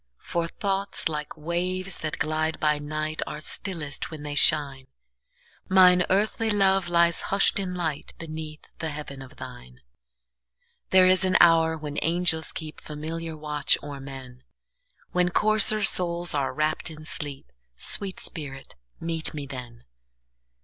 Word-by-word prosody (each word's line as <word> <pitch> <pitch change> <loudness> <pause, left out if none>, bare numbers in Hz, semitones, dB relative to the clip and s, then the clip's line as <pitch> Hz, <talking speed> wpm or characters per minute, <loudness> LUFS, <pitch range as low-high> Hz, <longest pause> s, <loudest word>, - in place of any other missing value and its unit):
For 170 -1 -2
thoughts, 195 +2 -1
like 150 -1 -5
waves 180 +4 -2
that 155 -1 -3
glide 155 +1 -1
by 150 -1 +2
night, 155 +1 -3
Are 150 - -5
stillest 155 -3 -2
when 155 -2 -8
they 145 -1 -4
shine; 135 -2 +4 0.8
Mine 180 -1 +6
earthly 215 +3 +1
love 195 -3 +3
lies 170 -1 +3
hush'd 195 +1 +3
in 185 -2 -3
lightBeneath 155 -1 -5 0.2
the 160 - -2
heaven 145 -2 -7
of 130 - -12
thine. 60 +1 -11 1.1
There 185 -1 +6
is 185 0 +4
an 185 0 +4
hour 165 -1 +5
when 150 -1 -4
angels 165 -1 +2
keepFamiliar 160 +1 -6
watch 150 -1 +2
o'er 145 -1 -7
men, 130 -2 -10 0.7
When 180 0 +2
coarser 215 +2 +3
souls 175 -2 +1
are 140 -2 0
wrapp'd 155 +1 -1
in 155 -1 -10
sleep—Sweet 135 - -4
spirit, 135 -4 -7 0.3
meet 165 -1 -3
me 145 -2 -4
then! 125 -4 -9
160 Hz, 130 wpm, -26 LUFS, 145-180 Hz, 1.1 s, Mine